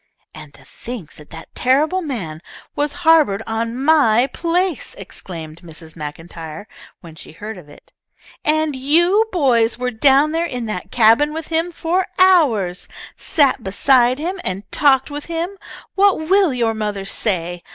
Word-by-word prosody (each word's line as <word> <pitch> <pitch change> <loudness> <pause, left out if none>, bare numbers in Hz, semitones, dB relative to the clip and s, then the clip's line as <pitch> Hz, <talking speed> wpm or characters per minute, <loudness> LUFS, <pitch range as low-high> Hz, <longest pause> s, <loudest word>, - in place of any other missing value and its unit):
"And 150 - -11
to 135 - -19
think 230 - -9
that 150 - -16
that 165 0 -12
terrible 300 +8 +1
man 190 - -5 0.3
was 290 0 -1
harboured 300 -11 +4
on 230 +1 -3
my 265 -7 +4
place!" 345 -2 -1
exclaimed 165 -4 -9
Mrs. 160 -2 -12
MacIntyre 165 +4 -8 0.3
when 165 -2 -12
she 155 - -13
heard 210 +6 -8
of 175 -6 -14
it. - - -18 0.5
"And 310 -1 +1
you 345 +11 +3
boys 245 -10 +2
were 250 0 -2
down 275 +5 +3
there 330 +2 -1
in 250 -6 -4
the 215 -5 -4
cabin 245 +6 +3
with 320 0 -6
him 330 +2 -1
for 350 +3 -1
hours! 270 - +3 0.3
Sat 280 -5 +1
beside 245 +5 +2
him 355 +6 -4
and 185 +2 -2
talked 270 -1 +3
with 290 0 -6
him! 340 +3 -4 0.4
What 400 -1 +3
will 370 +2 +2
your 235 -3 0
mother 210 -3 -4
say? 175 -4 -2
250 Hz, 150 wpm, -19 LUFS, 195-315 Hz, 0.5 s, harboured